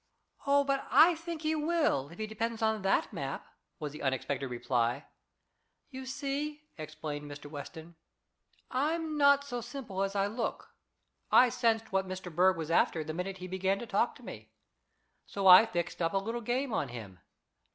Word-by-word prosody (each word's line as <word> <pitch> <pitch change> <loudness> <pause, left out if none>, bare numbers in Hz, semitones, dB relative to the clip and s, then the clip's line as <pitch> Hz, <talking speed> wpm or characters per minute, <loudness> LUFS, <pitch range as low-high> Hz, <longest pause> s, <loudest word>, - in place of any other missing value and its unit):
"Oh, 280 0 +4
but 275 -1 -1
I 340 +3 +7
think 330 -1 -6
he 310 +1 +1
will, 305 - +1
if 170 - -13
he 220 - -3
depends 225 +1 -3
on 220 -1 +1
that 195 0 +1
map," 135 -1 -4 0.3
was 150 -2 -5
the 150 - -9
unexpected 135 0 -1
reply. 120 -1 -1 0.9
"You 260 0 -7
see," 290 +3 -3
explained 155 -1 -6
Mr. 145 0 -9
Weston, 160 +3 -9 0.8
"I'm 310 +4 -1
not 280 -1 +5
so 245 -4 -5
simple 235 -5 -6
as 195 +1 -1
I 195 0 +2
look. 225 +3 -4 0.6
I 250 - +7
sensed 225 -2 0
what 190 0 0
Mr. 185 -3 -7
Berg 185 +1 +4
was 160 0 -4
after, 165 -1 +2
the 155 +1 -5
minute 185 +3 -4
he 185 0 -7
began 190 +1 0
to 235 - -6
talk - - 0
to - - -16
me. - - -9 0.8
So 200 -1 -4
I 185 +4 +10
fixed 175 -3 -3
up 165 +1 +1
a - - +2
little 225 +5 -3
game 245 +2 -1
on 145 - 0
him. 110 -7 -9
195 Hz, 175 wpm, -31 LUFS, 160-265 Hz, 0.9 s, I